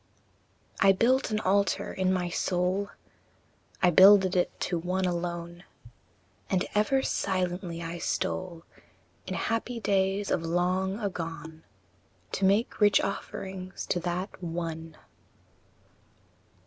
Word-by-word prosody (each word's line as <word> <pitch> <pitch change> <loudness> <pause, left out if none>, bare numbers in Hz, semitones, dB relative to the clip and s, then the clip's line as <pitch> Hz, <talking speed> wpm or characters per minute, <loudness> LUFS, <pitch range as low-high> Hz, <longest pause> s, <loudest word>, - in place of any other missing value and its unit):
I. - - +4
I - - +9
built 255 +7 +2
an 215 -1 0
altar 200 +1 +1
in 185 0 +1
my 180 -1 0
soul, 180 +3 -1 0.9
I 180 - +6
builded 190 +1 +7
it 180 - 0
to 175 -2 -1
one 185 +2 -1
alone; 175 0 -4 0.9
And 185 -2 +1
ever 240 +6 +2
silently 180 -2 -2
I 165 +1 -5
stole, 170 0 -3 0.6
In - - -3
happy 230 +1 -2
days 195 -1 0
of - - +1
long 180 +4 0
agone, 165 -6 -5 0.7
To 195 - 0
make 205 +4 +1
rich 205 -1 +6
offerings 190 -1 -5
to 175 - +1
that 180 +3 -4
ONE. 165 -1 -5
185 Hz, 115 wpm, -28 LUFS, 175-195 Hz, 0.9 s, I